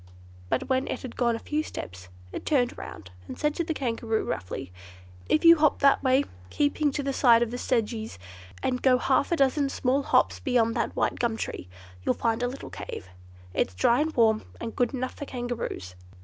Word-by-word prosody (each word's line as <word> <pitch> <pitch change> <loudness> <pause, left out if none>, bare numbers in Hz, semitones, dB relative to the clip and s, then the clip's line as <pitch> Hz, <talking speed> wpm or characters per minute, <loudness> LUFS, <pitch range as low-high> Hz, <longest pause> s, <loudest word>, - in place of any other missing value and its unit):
But - - 0
when 260 0 +1
it - - -4
had 255 - -7
gone 235 -2 +2
a 225 - -8
few 300 +1 0
steps 90 - -8 0.2
it - - -6
turned 250 -5 +1
round 95 -3 -9 0.2
and - - -7
said 300 0 +1
to 340 - -1
the 330 - -3
Kangaroo, 230 -4 -1
roughly, 90 0 -5 0.6
"If 310 - +2
you 335 0 +9
hop 305 -1 +3
that 275 -1 +5
way, 260 +1 +4 0.3
keeping 290 +1 +1
to 285 - -2
the 275 0 -1
side 235 -3 +5
of 235 - -4
the 245 - -4
sedges, 225 -3 -1 0.5
and 250 -1 0
go 255 -1 +5
half 265 +4 +1
a - - +4
dozen 275 -1 +2
small 270 +1 +1
hops - - +2
beyond 240 -4 +2
that - - -2
white - - 0
gum 235 -2 0
tree, 90 - -5 0.3
you'll - - +1
find 230 0 0
a 245 - +1
little 265 +3 -7
cave. 95 - -7 0.4
It's 95 - 0
dry 235 - +3
and 315 +1 0
warm, 220 -2 +4 0.2
and 230 -1 -5
good 245 -1 +1
enough 255 0 -3
for 285 - -7
Kangaroos." 240 - -4
250 Hz, 205 wpm, -27 LUFS, 230-275 Hz, 0.6 s, you